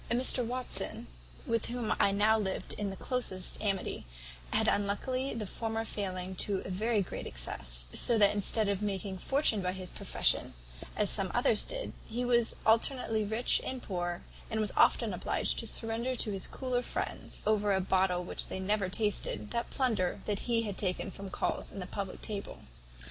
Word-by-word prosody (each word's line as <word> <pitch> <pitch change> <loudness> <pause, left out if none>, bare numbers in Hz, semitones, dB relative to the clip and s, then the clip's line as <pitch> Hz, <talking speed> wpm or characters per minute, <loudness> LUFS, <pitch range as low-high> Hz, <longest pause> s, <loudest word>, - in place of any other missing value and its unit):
"Mr 250 +1 +5
Watson, 250 +2 -1 0.4
with 230 -1 0
whom 240 -2 -1
I 200 - +4
now 210 +2 +4
lived 190 -2 -3
in 205 -1 -3
the 195 - -6
closest 195 -6 -1
amity, 195 - -2 0.4
had - - +2
unluckily 255 +7 0
the 220 -2 -3
former 225 +2 -3
failing 185 -3 -4
to 195 0 0
a - - -5
very 215 +2 +1
great - - -6
excess; - - -2
so 235 - +6
that 205 -1 +5
instead 210 +1 +3
of 200 0 -1
making 195 -2 -2
a - - -12
fortune 270 -5 +2
by 180 0 -1
his 185 -1 -7
profession, - - 0 0.4
as 210 -1 +1
some 195 -3 +2
others 240 -3 +3
did, - - -4
he 240 +2 -2
was 240 -2 +2
alternately 225 0 +3
rich 220 +4 +2
and 260 -1 -5
poor, 175 -2 -3 0.3
and 220 -2 -1
was 215 -1 0
often - - +4
obliged - - 0
to - - -1
surrender 230 +3 +1
to 220 -3 +1
his 195 -2 +2
cooler 255 -2 -2
friends, - - -5
over 210 -1 +2
a 190 - +3
bottle 185 -1 +1
which - - -1
they - - -5
never 195 0 0
tasted, 210 +1 0
that 235 0 -2
plunder 220 -9 0
that 210 +3 -2
he 230 -1 +3
had 205 -3 -4
taken 185 -1 -1
from 195 0 -7
culls - - -2
at 200 - -7
the 180 - -4
public 195 0 -6
table. 205 -2 -5
210 Hz, 180 wpm, -31 LUFS, 190-230 Hz, 0.4 s, so